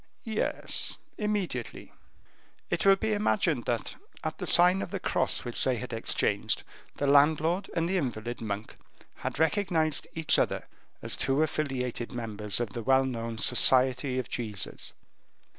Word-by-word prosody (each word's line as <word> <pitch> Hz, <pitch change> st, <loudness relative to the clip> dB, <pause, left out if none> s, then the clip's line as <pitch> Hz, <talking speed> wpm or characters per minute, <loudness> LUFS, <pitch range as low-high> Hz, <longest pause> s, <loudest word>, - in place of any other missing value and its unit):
"Yes, 220 Hz, -2 st, -2 dB, 0.2 s
immediately." 205 Hz, -, -3 dB, 0.8 s
It -, -, +1 dB
will 195 Hz, -, +8 dB
be 220 Hz, +2 st, -1 dB
imagined 190 Hz, -, +1 dB
that, 120 Hz, -1 st, -2 dB, 0.3 s
at -, -, -4 dB
the -, -, -4 dB
sign 180 Hz, +2 st, +6 dB
of -, -, -4 dB
the -, -, -4 dB
cross -, -, -1 dB
which 120 Hz, -, -1 dB
they 130 Hz, -, +2 dB
had 125 Hz, +1 st, -6 dB
exchanged, 115 Hz, -, 0 dB, 0.3 s
the 145 Hz, -, -2 dB
landlord 155 Hz, +6 st, +3 dB
and 165 Hz, -1 st, +1 dB
the 190 Hz, +2 st, +1 dB
invalid 120 Hz, -6 st, -3 dB
monk 105 Hz, -1 st, -5 dB, 0.4 s
had -, -, -4 dB
recognized 160 Hz, -1 st, +1 dB
each 160 Hz, -1 st, +4 dB
other -, -, 0 dB, 0.4 s
as -, -, -2 dB
two 135 Hz, +3 st, +1 dB
affiliated 130 Hz, -6 st, -2 dB
members 105 Hz, -3 st, -2 dB
of 115 Hz, -4 st, -3 dB
the 120 Hz, -, -4 dB
well 130 Hz, +3 st, +4 dB
known 115 Hz, -3 st, -4 dB
Society 130 Hz, +4 st, +3 dB
of 130 Hz, -, -2 dB
Jesus. 105 Hz, -5 st, -3 dB
135 Hz, 145 wpm, -29 LUFS, 120-165 Hz, 0.8 s, will